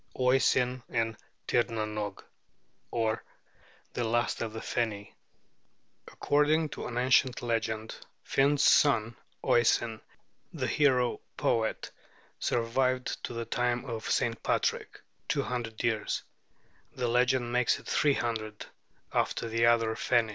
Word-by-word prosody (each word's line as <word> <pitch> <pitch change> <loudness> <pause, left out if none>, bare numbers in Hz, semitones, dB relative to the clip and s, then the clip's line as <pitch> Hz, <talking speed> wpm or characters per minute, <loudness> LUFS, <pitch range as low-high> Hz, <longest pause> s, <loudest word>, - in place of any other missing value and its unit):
OISIN 125 0 +3
IN 115 -1 0 0.3
TIRNANOGE; 110 -4 -1 0.7
or 110 -2 -1 0.7
THE 120 - -1
LAST 120 +1 0
OF 115 -2 -2
THE 110 - -6
FENI 110 -3 -3 0.9
[According 150 +2 +2
to - - -6
an 120 - -5
ancient 125 0 +3
legend, 110 -2 -2 0.3
Finn's 140 +1 +2
son 120 -5 +4 0.3
Oisin, 115 -1 +2 0.5
the - - -2
hero 130 -5 +2 0.2
poet, 110 -1 0 0.5
survived 125 +2 0
to - - -6
the 115 0 -4
time 120 +2 -1
of 115 -4 -5
St. - - 0
Patrick, - - -1 0.3
two - - +1
hundred 120 -3 -4
years 110 -3 0 0.7
(the 125 -1 -1
legend 125 0 +2
makes 125 -1 +2
it - - -14
three 145 -2 +2
hundred) 110 -3 -3 0.5
after - - 0
the 115 +1 +3
other 115 -1 +3
Feni. 115 0 +1
120 Hz, 120 wpm, -29 LUFS, 110-125 Hz, 0.9 s, son